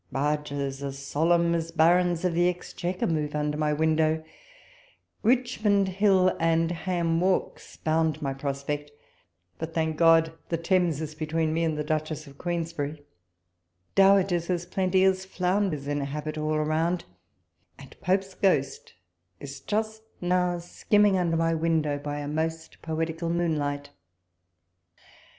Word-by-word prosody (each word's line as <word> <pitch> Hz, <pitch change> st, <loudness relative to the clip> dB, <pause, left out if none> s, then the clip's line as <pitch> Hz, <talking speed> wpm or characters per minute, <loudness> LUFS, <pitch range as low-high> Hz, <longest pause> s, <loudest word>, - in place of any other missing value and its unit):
barges 140 Hz, -1 st, -2 dB
as 140 Hz, -1 st, -4 dB
solemn 170 Hz, +5 st, +2 dB
as 165 Hz, -1 st, -1 dB
Barons 175 Hz, +1 st, +3 dB
of 180 Hz, -, +1 dB
the 175 Hz, +1 st, +3 dB
Exchequer 180 Hz, 0 st, -3 dB
move 150 Hz, -2 st, -1 dB
under 150 Hz, 0 st, -1 dB
my 150 Hz, 0 st, 0 dB
window; 160 Hz, +1 st, +1 dB, 1.0 s
Richmond 220 Hz, -5 st, +2 dB
Hill 190 Hz, -1 st, +3 dB
and 165 Hz, 0 st, +2 dB
Ham 170 Hz, -1 st, -1 dB
walks 185 Hz, 0 st, -1 dB
bound 160 Hz, -1 st, 0 dB
my 140 Hz, -3 st, -2 dB
prospect; 140 Hz, +2 st, -4 dB, 0.7 s
but, 160 Hz, 0 st, -5 dB
thank 160 Hz, -1 st, 0 dB
God! 165 Hz, -1 st, +5 dB, 0.2 s
the 165 Hz, -, 0 dB
Thames 165 Hz, -2 st, +1 dB
is 155 Hz, -1 st, -5 dB
between 155 Hz, +1 st, -1 dB
me 165 Hz, +1 st, 0 dB
and 160 Hz, -2 st, 0 dB
the 150 Hz, -, -1 dB
Duchess 155 Hz, 0 st, -2 dB
of 140 Hz, -1 st, -15 dB
Queensberry. 160 Hz, -4 st, -3 dB, 0.9 s
Dowagers 195 Hz, -3 st, +4 dB
as 175 Hz, -1 st, -1 dB
plenty 185 Hz, +1 st, +1 dB
aS 190 Hz, 0 st, +2 dB
flounders 185 Hz, -5 st, -1 dB
inhabit 145 Hz, +2 st, -3 dB
all 155 Hz, 0 st, -1 dB
around, 160 Hz, +3 st, 0 dB, 0.7 s
and 135 Hz, -1 st, -13 dB
Pope's 190 Hz, +1 st, 0 dB
ghost 145 Hz, -9 st, 0 dB, 0.4 s
is 140 Hz, 0 st, -8 dB
just 220 Hz, +5 st, -2 dB, 0.2 s
now 180 Hz, 0 st, +1 dB
skimming 205 Hz, +4 st, +2 dB
under 170 Hz, -3 st, +1 dB
my 165 Hz, 0 st, +2 dB
window 160 Hz, -3 st, 0 dB
by 145 Hz, 0 st, -4 dB
a 145 Hz, -, -5 dB
most 160 Hz, +2 st, -3 dB
poetical 165 Hz, +1 st, -3 dB
moonlight. 150 Hz, -4 st, -1 dB
165 Hz, 130 wpm, -27 LUFS, 150-180 Hz, 1.0 s, God